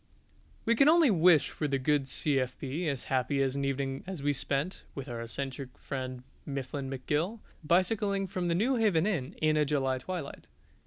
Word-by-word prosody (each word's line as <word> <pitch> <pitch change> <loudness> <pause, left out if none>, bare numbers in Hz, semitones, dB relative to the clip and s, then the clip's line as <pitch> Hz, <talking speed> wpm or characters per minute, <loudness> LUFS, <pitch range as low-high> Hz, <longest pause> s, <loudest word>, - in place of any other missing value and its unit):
We 230 - +4
can 275 +5 +6
only 325 -5 +6
wish 170 -4 +5
for 150 - -2
the 140 -1 +1
good 135 +1 +1
C.F.B. 135 +3 -1
as 140 -3 -3
happy 135 +1 +1
an 135 +1 -1
evening 135 0 -2
as 185 -7 -5
we 145 0 +2
spent 140 +6 -2
(with 135 -1 -6
our 120 -2 -5
eccentric 130 +2 -5
friend 130 -2 -5 0.2
Mifflin 135 0 -4
McGill) 150 - -1 0.3
bicycling 195 +4 +2
from 185 -1 -3
the 170 - +1
Newhaven 215 -5 +2
Inn 170 -12 -2
in 155 0 +4
a 150 - +4
July 135 -3 0
twilight. 170 -1 -6
145 Hz, 165 wpm, -30 LUFS, 135-180 Hz, 0.3 s, can